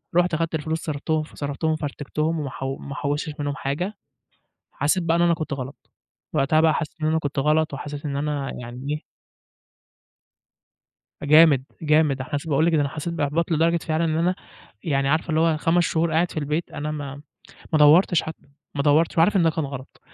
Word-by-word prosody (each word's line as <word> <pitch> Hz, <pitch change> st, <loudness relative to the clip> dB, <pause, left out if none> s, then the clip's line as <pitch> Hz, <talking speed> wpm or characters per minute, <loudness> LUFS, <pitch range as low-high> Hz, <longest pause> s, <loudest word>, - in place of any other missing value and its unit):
رُحت 175 Hz, 0 st, +3 dB
أخدت 165 Hz, +1 st, -1 dB
الفلوس 160 Hz, +1 st, -2 dB
صرفتهم 155 Hz, +1 st, -1 dB
فصرفتهم 155 Hz, +1 st, -3 dB
فرتكتهم 155 Hz, +2 st, -2 dB
وما 145 Hz, -3 st, -3 dB
حو 135 Hz, +1 st, -4 dB
ما 140 Hz, -, -8 dB
حوشتش 145 Hz, +1 st, -2 dB
منهم 145 Hz, -1 st, -2 dB
حاجة. 175 Hz, +11 st, -3 dB, 0.7 s
حسيت 155 Hz, +6 st, 0 dB
بقى 165 Hz, 0 st, +2 dB
إن -, -, +2 dB
أنا 175 Hz, 0 st, +4 dB
كنت 155 Hz, -3 st, -4 dB
غلط. 135 Hz, +1 st, -8 dB, 0.4 s
وقتها 155 Hz, +3 st, +3 dB
بقى 160 Hz, -1 st, +4 dB
حسيت 155 Hz, -3 st, -3 dB
إن 155 Hz, -, +1 dB
أنا 160 Hz, +1 st, +2 dB
كنت 145 Hz, -2 st, -3 dB
غلط 155 Hz, +2 st, +2 dB
وحسيت 145 Hz, +1 st, -6 dB
إن 140 Hz, -, -3 dB
أنا 145 Hz, -1 st, -2 dB
يعني 125 Hz, +2 st, -8 dB
إيه 150 Hz, +1 st, -2 dB, 2.2 s
جامد، 150 Hz, -3 st, +6 dB, 0.2 s
جامد، 150 Hz, -3 st, +2 dB
حاس 145 Hz, +3 st, -4 dB
باقُول 155 Hz, +1 st, +2 dB
لِك 170 Hz, -, +2 dB
إن 150 Hz, -, +3 dB
أنا 140 Hz, -, +1 dB
حسّيت 155 Hz, +3 st, -5 dB
باحباط 160 Hz, +2 st, 0 dB
لدرجة 165 Hz, +2 st, +3 dB
فعلًا 160 Hz, 0 st, -1 dB
إن 155 Hz, -1 st, 0 dB
أنا 180 Hz, +2 st, +2 dB, 0.5 s
يعني 140 Hz, -5 st, 0 dB
عارفة 155 Hz, +4 st, +1 dB
اللي 155 Hz, -, +2 dB
هو 165 Hz, -1 st, +3 dB
5 165 Hz, +3 st, +2 dB
شهور 165 Hz, -1 st, 0 dB
قاعد 170 Hz, +2 st, +2 dB
في -, -, -15 dB
البيت، 150 Hz, +3 st, -2 dB
أنا 150 Hz, +1 st, -4 dB
ما 145 Hz, -2 st, -6 dB, 0.5 s
ما 155 Hz, -, +4 dB
دوّرتش 155 Hz, +3 st, +6 dB
حتّى، 160 Hz, -2 st, -9 dB, 0.3 s
ما 140 Hz, -, -1 dB
دوّرتش، 155 Hz, +3 st, +3 dB
وعارف 195 Hz, +5 st, +4 dB
إن 180 Hz, -, +4 dB
ده 165 Hz, -, +4 dB
كان 160 Hz, 0 st, -2 dB
غلط. 135 Hz, -1 st, -8 dB
155 Hz, 190 wpm, -23 LUFS, 145-165 Hz, 2.2 s, جامد